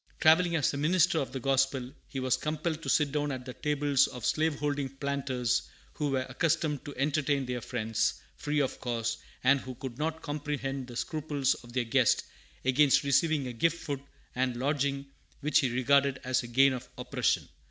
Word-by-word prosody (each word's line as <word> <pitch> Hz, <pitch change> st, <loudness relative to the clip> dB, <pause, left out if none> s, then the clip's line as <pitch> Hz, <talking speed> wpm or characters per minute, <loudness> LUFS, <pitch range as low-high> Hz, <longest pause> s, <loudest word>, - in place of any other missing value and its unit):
Travelling 170 Hz, +2 st, +5 dB
as 150 Hz, -3 st, +2 dB
a -, -, -3 dB
minister 165 Hz, +2 st, +3 dB
of 135 Hz, -, -3 dB
the 135 Hz, -, -4 dB
gospel, 135 Hz, -1 st, +1 dB, 0.2 s
he 135 Hz, -, -5 dB
was 130 Hz, -1 st, +2 dB
compelled 155 Hz, +1 st, -2 dB
to -, -, -4 dB
sit 150 Hz, -2 st, +3 dB
down 145 Hz, 0 st, -1 dB
at 130 Hz, -2 st, -5 dB
the 125 Hz, -, -6 dB
tables 145 Hz, -2 st, +2 dB
of 125 Hz, -3 st, -7 dB
slaveholding 145 Hz, -3 st, 0 dB
planters, 135 Hz, -3 st, -1 dB, 0.2 s
who 150 Hz, -1 st, -1 dB
were 130 Hz, -1 st, 0 dB
accustomed 150 Hz, +1 st, 0 dB
to 145 Hz, -, -7 dB
entertain 140 Hz, -1 st, +1 dB
their 125 Hz, -1 st, -3 dB
friends 115 Hz, -2 st, -1 dB, 0.2 s
free 150 Hz, 0 st, -1 dB
of 135 Hz, -, -2 dB
cost, 115 Hz, -2 st, -2 dB, 0.2 s
and 135 Hz, +2 st, +5 dB
who 130 Hz, -1 st, -8 dB
could 125 Hz, +1 st, -7 dB
not 160 Hz, +1 st, -2 dB
comprehend 145 Hz, -3 st, -3 dB
the 120 Hz, -, -9 dB
scruples 145 Hz, -3 st, 0 dB
of 120 Hz, -1 st, -12 dB
their 130 Hz, -1 st, +1 dB
guest 120 Hz, 0 st, +3 dB, 0.4 s
against 135 Hz, +2 st, +4 dB
receiving 140 Hz, +1 st, +2 dB
as 125 Hz, -, -4 dB
a -, -, -9 dB
gift 165 Hz, +8 st, +1 dB
food 140 Hz, -3 st, -3 dB, 0.3 s
and 125 Hz, -1 st, 0 dB
lodging 140 Hz, +1 st, 0 dB, 0.4 s
which 150 Hz, +1 st, +3 dB
he 130 Hz, -, +1 dB
regarded 135 Hz, +2 st, +3 dB
as 130 Hz, -1 st, +1 dB
the 120 Hz, -, -8 dB
gain 135 Hz, +3 st, +4 dB
of 125 Hz, 0 st, -6 dB
oppression. -, -, 0 dB
140 Hz, 185 wpm, -30 LUFS, 130-150 Hz, 0.4 s, Travelling